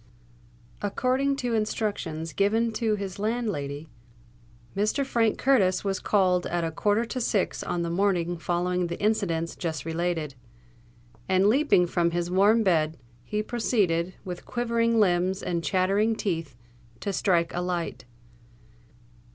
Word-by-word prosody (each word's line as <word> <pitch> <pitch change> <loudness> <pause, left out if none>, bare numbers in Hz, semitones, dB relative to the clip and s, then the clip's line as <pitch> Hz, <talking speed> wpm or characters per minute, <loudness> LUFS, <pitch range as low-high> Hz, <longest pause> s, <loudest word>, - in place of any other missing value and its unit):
According 255 +7 +1
to 245 -3 -2
instructions 200 -8 -2
given 225 +4 +2
to 220 -1 0
his 195 -2 -6
landlady, 200 -10 -2 0.9
Mr. 215 +8 +1
Frank 230 -4 +1
Curtis 210 -9 +3
was 195 -2 -1
called 185 -3 +2
at 175 -1 -1
a 165 - -1
quarter 205 +7 +1
to 255 +2 -4
six 205 -4 0
on 175 -1 -2
the 170 - -2
morning 175 -2 0
following 175 +2 0
the 170 - -5
incidents 180 -6 0
just 160 -5 -4
related; 165 -3 -2 1.0
and 190 +1 +3
leaping 245 -6 +4
from 170 -1 +1
his 175 +1 -2
warm 205 +5 +4
bed, 160 -5 +2 0.3
he 210 - -2
proceeded, 190 -7 0
with 180 -1 -6
quivering 230 -1 +1
limbs 185 -1 +2
and 170 -1 -2
chattering 200 +5 +2
teeth, 165 - -3 0.4
to 200 - -3
strike 170 -3 +1
a 175 - -1
light. 175 -6 -3
190 Hz, 135 wpm, -26 LUFS, 170-220 Hz, 1.0 s, leaping